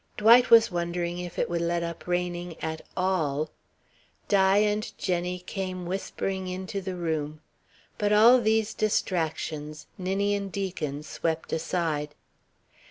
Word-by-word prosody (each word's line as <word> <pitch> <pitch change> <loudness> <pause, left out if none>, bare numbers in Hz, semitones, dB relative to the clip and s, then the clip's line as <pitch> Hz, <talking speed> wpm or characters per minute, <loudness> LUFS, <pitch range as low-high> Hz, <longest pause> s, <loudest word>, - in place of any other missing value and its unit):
Dwight 235 +4 +7
was 230 -1 +7
wondering 175 0 -2
if 175 -1 -7
it - - +1
would 170 -1 -1
let 170 0 0
up 170 0 -6
raining 175 -1 -2
at 160 0 -4 0.2
all. 155 -6 0 0.8
Di 195 -1 +4
and 210 0 +1
Jenny 180 -1 -1
came 185 0 -5
whispering 190 +1 -3
into 190 +2 -4
the 190 -1 -4
room. 155 -3 -2 0.6
But 205 0 +1
all 230 +4 +7
these 220 -1 +1
distractions 155 -6 -2
Ninian 200 +2 0
Deacon 175 -7 -3
swept 160 +1 -3
aside. 160 -3 -1
180 Hz, 125 wpm, -27 LUFS, 165-200 Hz, 0.8 s, Dwight